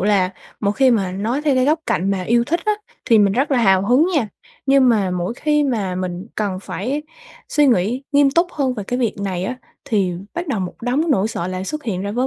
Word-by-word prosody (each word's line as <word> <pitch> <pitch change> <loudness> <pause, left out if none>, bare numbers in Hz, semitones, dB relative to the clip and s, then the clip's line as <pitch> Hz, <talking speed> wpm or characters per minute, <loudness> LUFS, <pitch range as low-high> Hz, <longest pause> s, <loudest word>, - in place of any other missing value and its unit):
là 195 -2 +2 0.3
một 200 -1 +1
khi 265 +2 +4
mà 195 -6 +1
nói 230 +9 -2
theo 290 -3 +2
cái 255 0 +3
góc 310 +3 +2
cạnh 195 +3 0
mà 190 -2 -1
yêu 235 +4 +2
thích 335 +5 -1
á, 425 - +3 0.3
thì 230 -3 +4
mình 200 -1 +4
rất 270 +6 0
là 270 - +3
hào 195 -3 +3
hứng 260 +8 +4
nha, 255 -9 +1 0.4
nhưng 270 -1 +5
mà 205 -6 +2
mỗi 180 +5 -2
khi 300 +2 +1
mà 210 -9 -1
mình 180 +1 -4
cần 200 -3 -2
phải 260 +10 -3 0.5
suy 295 -1 +3
nghĩ 240 +1 +1
nghiêm 285 -1 +5
túc 340 +5 +3
hơn 265 -4 0
về 210 - -5
cái 245 +4 -2
việc 235 -4 0
này 185 -2 -2
á, 250 +5 -3 0.3
thì 195 -5 0 0.2
bắt 345 0 -3
đầu 220 -8 -1
một 180 - -4
đống 285 +7 0
nỗi 215 -5 +2
sợ 175 -5 -3
lại 185 0 -4
xuất 305 +8 -4
hiện 190 -6 -2
ra 200 - -3
với 250 +3 0
230 Hz, 245 wpm, -20 LUFS, 190-275 Hz, 0.5 s, nhưng